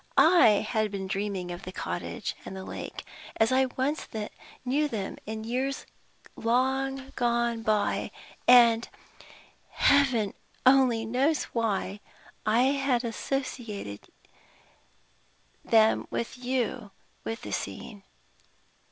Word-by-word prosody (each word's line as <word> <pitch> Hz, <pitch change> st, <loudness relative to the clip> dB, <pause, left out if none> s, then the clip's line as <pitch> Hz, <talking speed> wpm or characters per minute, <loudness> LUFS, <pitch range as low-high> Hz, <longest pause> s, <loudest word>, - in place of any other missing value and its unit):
I 270 Hz, -, +6 dB
had 215 Hz, -2 st, 0 dB
been 195 Hz, -1 st, -4 dB
dreaming 195 Hz, -2 st, -3 dB
of 175 Hz, -, -6 dB
the 185 Hz, -, -7 dB
cottage -, -, -4 dB
and -, -, -8 dB
the 190 Hz, -, -6 dB
lake, -, -, -7 dB, 0.3 s
as 225 Hz, +1 st, +3 dB
I 260 Hz, 0 st, +4 dB
once 285 Hz, +4 st, -1 dB, 0.6 s
knew 285 Hz, +4 st, +2 dB
them 210 Hz, -8 st, -4 dB
in 220 Hz, 0 st, -4 dB
years 260 Hz, +4 st, -2 dB, 0.5 s
long 265 Hz, +3 st, 0 dB
gone 235 Hz, -1 st, +1 dB
by; 215 Hz, -2 st, 0 dB, 0.4 s
and 235 Hz, -2 st, +7 dB, 0.8 s
Heaven 260 Hz, -8 st, +3 dB, 0.3 s
only 255 Hz, -4 st, +5 dB
knows 265 Hz, +7 st, +1 dB
why 205 Hz, -3 st, -1 dB, 0.5 s
I 225 Hz, +3 st, +4 dB
had 270 Hz, -2 st, +1 dB
associated 230 Hz, -, -4 dB, 1.6 s
you 235 Hz, 0 st, +1 dB, 0.3 s
with 225 Hz, -, -4 dB
the -, -, -6 dB
scene. 220 Hz, -3 st, -5 dB
235 Hz, 100 wpm, -28 LUFS, 215-265 Hz, 1.6 s, and